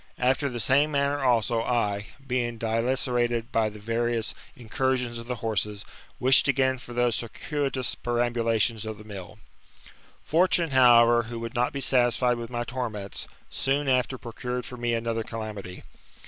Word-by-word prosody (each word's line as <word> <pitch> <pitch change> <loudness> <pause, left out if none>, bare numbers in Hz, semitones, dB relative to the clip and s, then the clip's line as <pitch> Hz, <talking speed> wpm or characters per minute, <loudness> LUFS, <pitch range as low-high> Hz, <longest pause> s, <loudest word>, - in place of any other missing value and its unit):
Aft%r 130 +3 +1
the 120 -2 -5
same 135 +7 +3
manner 140 -1 0
also, 115 -2 +2
I, 105 -4 -1 0.2
being 120 -2 -1
dilacerated 120 +1 0
by 110 -1 +2
the 105 - -11
various 115 +1 -1 0.2
in 120 -3 -12
cursions 125 -1 0
of 115 - -9
the 125 - -2
horses, 105 -1 -1 0.3
wished 130 +2 +5
again 130 -1 +2
for 120 - -11
those 120 -1 +2
circuitous 135 +1 -2
perambulations 115 -2 0
of 110 -1 -5
the 105 - -12
mill. 105 0 -9 0.9
Fortune, 170 -1 +2
however, 120 -2 +6
who 120 -1 -5
would 115 0 -5
not 125 +4 +1
be 140 -3 -4
satisfied 125 -1 +3
with 115 -1 -6
my 120 -1 -2
torments, 115 -5 -5 0.2
soon 140 +2 0
after 130 -1 +1
procured 125 +1 -5
for 125 - -8
me 120 -1 -1
another 115 0 -1
calamity. 105 -5 -7
120 Hz, 155 wpm, -26 LUFS, 115-130 Hz, 0.9 s, however